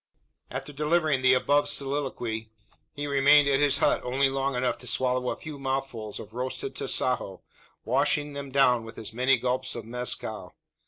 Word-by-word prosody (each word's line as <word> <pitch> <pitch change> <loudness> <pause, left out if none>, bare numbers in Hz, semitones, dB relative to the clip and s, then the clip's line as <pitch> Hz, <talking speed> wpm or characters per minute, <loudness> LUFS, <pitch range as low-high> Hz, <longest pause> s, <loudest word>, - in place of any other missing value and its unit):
After 145 - -6
delivering 150 -1 +1
the 130 0 +5
above 145 +3 +2
soliloquy, 130 -6 -2 0.5
he 145 - -4
remained 140 +1 +5
at 135 -1 +3
his 145 -1 +4
hut - - +2
only 135 +2 +2
long 135 0 -1
enough 125 -1 -1
to 125 - -9
swallow 125 0 0
a - - -2
few 150 -3 -9
mouthfuls 135 -5 -3
of 110 0 -10
roasted 130 - -4
tasajo, - - -1 0.4
washing 150 -1 +1
them 140 -1 -6
down 125 -3 +3
with 115 0 -11
as 110 0 -7
many 130 +3 +3
gulps 130 +1 -2
of 115 -2 -6
mezcal. 125 +2 -4
135 Hz, 165 wpm, -27 LUFS, 125-140 Hz, 0.5 s, the